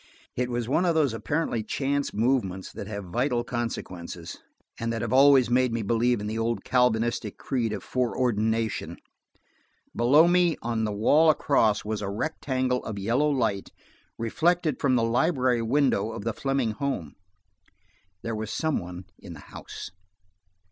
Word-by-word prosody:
It 125 0 -1
was 120 -2 -2
one 150 +7 +2
of 170 -2 +2
those 145 -7 +2
apparently 135 0 -1
chance 140 +5 -1
movements 105 -5 0
that 100 - -7
have 100 -1 -5
vital 120 +6 0
consequences, 90 -8 -5 0.4
and 115 0 -2
that 115 -1 -3
have 115 +1 -2
always 135 -1 +6
made 125 +1 +2
me 115 -1 -2
believe 120 +2 +1
in 105 - -5
the 110 +2 -3
old 115 +1 -1
Calvinistic 120 -3 +1
creed 120 -5 -2
of 105 -3 -5
foreordination. 115 -3 -1 1.0
Below 140 +8 +5
me, 175 -1 +3
on 115 -1 -1
the 105 - -2
wall 145 +10 +4
across, 135 -9 +2
was 110 0 -3
a 100 - -3
rectangle 130 +2 -1
of 110 -2 -5
yellow 120 +9 +1
light, 110 -8 -1 0.5
reflected 160 +6 0
from 130 -3 +2
the 115 - +2
library 125 0 +2
window 115 -3 +1
of 100 - -6
the 115 0 -1
Fleming 135 -3 -1
home. 110 - -3 1.1
There 115 -1 -3
was 110 0 -4
some 160 +5 0
one 90 +1 -8
in 85 - -10
the 80 - -11
house. - - -8
120 Hz, 155 wpm, -26 LUFS, 110-135 Hz, 1.1 s, always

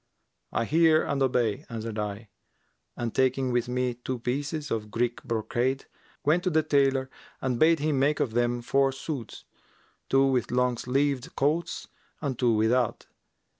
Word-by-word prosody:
'I 115 - 0
hear 160 +2 +4
and 140 -1 -2
obey,' 120 -5 +1
answered 115 -1 -5
I 105 +1 -4 0.7
and 120 -2 -3
taking 130 0 +1
with 120 0 0
me 125 0 0
two 125 +2 -5
pieces[FN#355] 145 +5 -3
of 105 -2 -2
Greek 120 +2 -1
brocade, 120 +4 -1 0.4
went 160 +5 +3
to 185 - +2
the 160 -2 +2
tailor 135 -3 +2 0.3
and 125 -2 -1
bade 165 +1 +5
him 150 -2 0
make 145 +2 +2
of 115 - 0
them 120 0 0
four 135 +2 +2
suits, 135 -2 -6 0.6
two 135 0 +4
with 130 -2 +1
long 125 0 +2
sleeved 135 +1 -1
coats 155 +5 0 0.3
and 135 -5 -3
two 120 -3 +3
without. 115 +2 +1
130 Hz, 155 wpm, -27 LUFS, 120-140 Hz, 0.7 s, bade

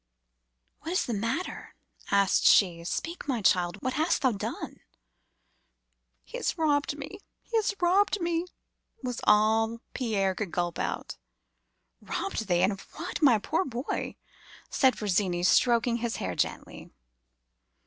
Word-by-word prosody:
"'What 330 - -5
is 370 - +1
the 240 - -3
matter?' 230 - -3 0.3
asked 200 -1 +3
she. 175 -4 +5
'Speak, 330 - -4
my 260 -4 0
child. 180 0 +2
What 255 - -1
hast 315 0 +1
thou 260 - +4
done?' 200 - -5 1.4
"'He - - -8
has - - -2
robbed 290 -2 +1
me! 295 +8 -8 0.2
he 465 - -6
has 415 -2 0
robbed 390 +4 +3
me!' 340 0 -1 0.6
was 250 -2 -3
all 220 +2 +3 0.2
Pierre 200 -6 0
could 200 0 -4
gulp 175 -1 -2
out. - - -3 0.8
"'Robbed 390 - -3
thee! 175 -1 +2
and 190 - +4
of 195 - -6
what, 340 +2 -5
my 265 -7 +6
poor 320 - 0
boy?' 250 -3 -4 0.6
said 265 -2 +3
Virginie, 185 -4 0
stroking 235 +4 +3
his 235 -1 -2
hair 90 - -3
gently. - - -3
235 Hz, 140 wpm, -28 LUFS, 200-315 Hz, 1.4 s, my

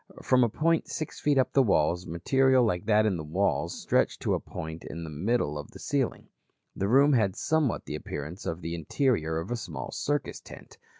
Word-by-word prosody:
From 130 -1 +4
a 120 - +2
point 165 +7 +1
six 155 -1 -5
feet 145 -2 +2
up 130 - +2
the 135 - +5
walls 90 - +2
material 130 - +3
like 100 -1 -1
that 110 0 +4
in 100 -5 +1
the 80 - -5
walls 90 +7 -1
stretched - - +1
to - - +1
a - - +1
point 80 +1 -7
in 85 +1 -7
the 80 - -7
middle 75 -2 0
of 75 - -8
the - - -12
ceiling. - - -2 0.5
The 100 - -1
room 140 +6 +5
had 105 -6 +2
somewhat 155 +2 0
the - - -6
appearance 75 +6 -6
of 85 +2 -3
the 85 +1 -4
interior 85 - 0
of 80 +7 -4
a - - +1
small 115 - -6
circus 145 0 -2
tent. - - -13
100 Hz, 205 wpm, -28 LUFS, 80-130 Hz, 0.5 s, the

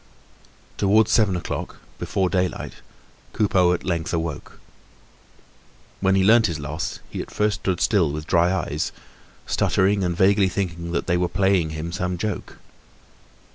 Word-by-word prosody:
Towards 105 +2 +4
seven 105 -5 +3
o'clock, 90 - -4 0.2
before 95 -1 0
daylight, 90 0 -2 0.6
Coupeau 95 -4 +3
at 90 - -1
length 85 -2 -2
awoke. 80 -3 -5 1.4
When 95 0 +2
he 95 - +3
learnt 110 +2 +5
his 85 -4 -3
loss 75 +3 -4
he - - -4
at - - -9
first 105 0 0
stood 90 -2 -1
still 90 -9 +2
with 75 +1 -5
dry 85 +1 +3
eyes, 80 -5 -2 0.5
stuttering 100 +1 +1
and 90 -1 -1
vaguely 95 0 +4
thinking 85 -3 -3
that - - -1
they 90 -1 +1
were 90 0 0
playing 95 -3 +2
him 80 +2 -5
some 90 -1 -2
joke. 105 +4 -4
90 Hz, 145 wpm, -23 LUFS, 85-100 Hz, 1.4 s, learnt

